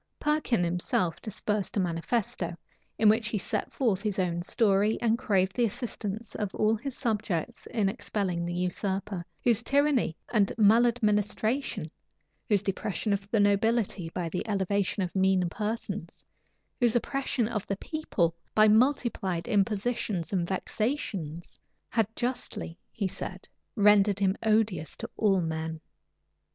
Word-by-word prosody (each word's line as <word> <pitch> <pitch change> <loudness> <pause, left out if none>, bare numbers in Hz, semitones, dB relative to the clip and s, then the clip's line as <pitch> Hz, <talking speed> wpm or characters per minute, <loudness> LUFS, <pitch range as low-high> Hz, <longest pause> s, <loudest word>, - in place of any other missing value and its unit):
Perkin 300 -10 +1
himself 175 0 0
dispersed 210 -1 -2
a - - +3
manifesto, 175 0 -1 0.4
in 220 - +4
which 220 +1 +4
he 215 - -1
set 190 - -2
forth 220 -8 +1
his 210 -2 -1
own 175 -2 0
story, 205 +2 +2
and 230 -1 +2
craved 190 -6 +1
the 245 - +2
assistance 215 -1 -4
of 205 -3 -3
all 215 +1 +3
his 255 +4 -6
subjects 215 - -2
in 210 -4 0
expelling 195 -4 -2
the 175 0 -3
usurper, 190 +1 -2 0.2
whose 235 -2 +3
tyranny 275 - +2 0.2
and 205 -4 +3
maladministration, 220 - +2 0.6
whose 205 -2 +3
depression 200 +1 -1
of 195 0 -3
the 220 - +2
nobility 205 -3 +2
by 170 0 -3
the 180 +2 -3
elevation 200 0 0
of 180 - -5
mean 190 -1 +3
persons, 220 +4 -4 0.5
whose 240 -2 +3
oppression 250 -1 0
of 215 -4 -3
the 195 - -2
people 200 - -1 0.2
by 215 0 +7
multiplied 215 -7 +2
impositions 210 -3 0
and 175 -3 +1
vexations, 190 - -3 0.3
had 225 -3 +2
justly, 245 -9 -3 0.2
he 200 -4 -2
said, 190 0 -6 0.3
rendered 205 -2 +5
him 195 -1 +2
odious 215 -7 +1
to - - -5
all 195 -4 +3
men. 160 -1 -3
205 Hz, 135 wpm, -28 LUFS, 185-225 Hz, 0.6 s, by